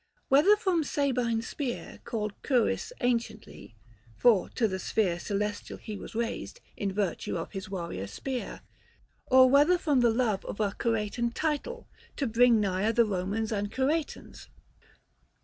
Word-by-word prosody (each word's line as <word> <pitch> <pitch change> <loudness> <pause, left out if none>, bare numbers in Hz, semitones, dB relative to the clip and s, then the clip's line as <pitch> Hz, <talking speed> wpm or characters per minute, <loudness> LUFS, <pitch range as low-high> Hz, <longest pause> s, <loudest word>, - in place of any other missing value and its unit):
Whether 300 +10 +6
from 375 -6 0
Sabine 250 -6 0
spear 250 +1 -5
Called 215 -2 -3
Curis 255 - +1
anciently; 235 - -3 0.4
for 230 -6 +4
to 230 - +1
the 190 -2 -3
sphere 185 -4 0
Celestial 205 +2 -3
he 215 - -7
was 200 - -9
raised, 235 - -3 0.2
in 200 -1 -2
virtue 190 -3 -2
of 165 - -5
His 195 0 -6
warrior 170 - -4
spear: 250 - -5 0.7
or 260 0 +7
whether 290 +7 +5
from 295 -6 +1
the 240 -1 +4
love 225 -4 0
Of - - -6
a 205 -2 +1
Curetan 230 +2 -1
title, 325 - -2 0.3
to 280 - -1
bring 235 0 +4
nigher 200 +2 0
The 235 - +5
Komans 205 +3 -2
and 205 -1 -2
Curetans. 290 +6 -2
230 Hz, 145 wpm, -28 LUFS, 205-265 Hz, 0.7 s, or